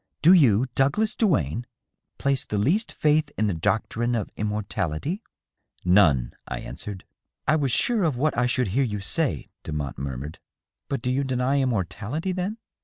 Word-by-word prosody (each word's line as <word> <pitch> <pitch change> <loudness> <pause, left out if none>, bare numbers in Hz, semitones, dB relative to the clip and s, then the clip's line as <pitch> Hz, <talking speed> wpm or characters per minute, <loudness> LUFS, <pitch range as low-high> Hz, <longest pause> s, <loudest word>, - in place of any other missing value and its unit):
Do 170 +4 +8
you, 125 - +5
Douglas 200 - +1
Duane, 120 - +1 0.5
place 140 -2 +1
the 105 - -3
least 175 - +1
faith 150 0 +2
in 110 - +2
the 100 - +1
doctrine 110 +7 0
of 110 - -3
immortality 105 - -2 0.2
?" - - -56
" - - -37
None," 90 -9 +4
I - - -4
answered. 90 +9 -7 0.4
"I 155 - +4
was 140 -5 +1
sure 225 - +2
of 155 -7 +1
what 150 +4 +1
I 125 +1 +2
should 125 -3 0
hear 135 +9 +2
you 105 -5 -2
say," 95 - 0
Demotte 75 -4 -4
murmured. 70 +2 -5 0.3
" - - -62
But 135 -4 -2
do 125 - 0
you 135 +2 +1
deny 130 +1 +1
immortality, 120 - -1
then 185 +4 -2
120 Hz, 175 wpm, -25 LUFS, 100-150 Hz, 0.5 s, Do